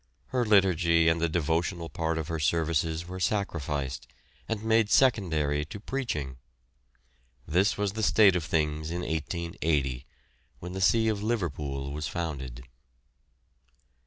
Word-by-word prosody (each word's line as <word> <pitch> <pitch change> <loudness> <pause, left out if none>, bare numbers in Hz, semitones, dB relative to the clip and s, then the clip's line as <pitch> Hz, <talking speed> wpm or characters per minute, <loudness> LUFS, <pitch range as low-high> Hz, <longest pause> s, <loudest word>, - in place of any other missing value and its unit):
Her 125 -1 +1
liturgy 90 -6 +4
and 80 0 +1
the 85 - +2
devotional 85 +2 -1
part 80 0 -2
of 80 -2 -3
her 80 -1 -3
services 80 +1 0
were 95 +1 -6
sacrificed, 75 -9 -2 0.4
and 110 -1 -2
made 110 -1 +3
secondary 80 - +2
to 90 +7 -8
preaching. 75 - -3 1.1
This 95 +6 +2
was 100 -1 0
the 110 - -3
state 105 -2 +5
of 90 - 0
things 75 0 -1
in 85 +1 -3
1880, 80 -5 -2 0.5
when 90 +1 -8
the 95 - -4
see 110 +3 +4
of 105 -2 0
Liverpool 75 - -2
was 75 0 -3
founded. 65 -8 -5
85 Hz, 130 wpm, -28 LUFS, 75-100 Hz, 1.1 s, state